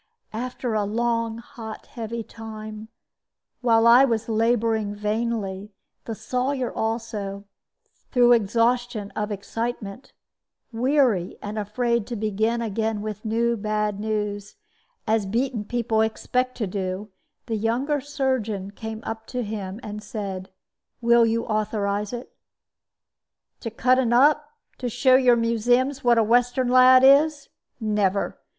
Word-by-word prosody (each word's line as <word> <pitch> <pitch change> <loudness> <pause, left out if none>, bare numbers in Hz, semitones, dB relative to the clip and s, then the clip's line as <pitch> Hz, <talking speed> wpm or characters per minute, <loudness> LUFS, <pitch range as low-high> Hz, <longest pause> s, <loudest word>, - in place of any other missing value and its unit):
After 245 +1 -3
a 215 -1 +1
long, 230 +1 -1
hot, 230 -2 -9
heavy 230 0 -5
time, 215 -1 -9 0.7
while 230 -2 +4
I 240 +3 +8
was 230 -4 0
laboring 225 -2 +1
vainly, 210 -2 -2 0.3
the 225 - -4
Sawyer 255 +2 -2
also 215 -3 -3 0.7
(through 245 -2 +5
exhaustion 230 -1 +1
of 210 0 -3
excitement) 215 +2 -5 0.6
weary, 245 -7 +1
and 210 +1 -5
afraid 235 +2 -1
to 240 - -4
begin 220 +2 0
again 220 -1 -2
with 215 -1 -5
new 235 +1 +1
bad 210 -1 -1
news, 210 -1 -3 0.5
as 220 -2 +1
beaten 230 +1 -1
people 230 -1 0
expect 250 +3 -1
to 225 - -1
do, 190 +1 -4 0.3
the 230 - -2
younger 250 +7 0
surgeon 255 -9 -2
came 220 +1 -7
up 225 0 -6
to 250 -1 -3
him, 205 -2 -5
and 210 0 -6
said, 195 -3 -5 0.5
"Will 235 -1 +5
you 230 +1 0
authorize 210 -1 -1
it?" 245 0 -8 1.2
"To 230 - -5
cut 250 +3 +2
'un 240 -2 +1
up? 295 +4 +4 0.3
To 250 - -2
show 255 +3 +4
your 255 -2 +5
museums 245 +4 +1
what 240 -1 +4
a 225 - +5
Western 245 +3 +2
lad 255 +1 +7
is? 285 +2 +5 0.3
Never. 210 -3 0
225 Hz, 130 wpm, -24 LUFS, 210-245 Hz, 1.2 s, I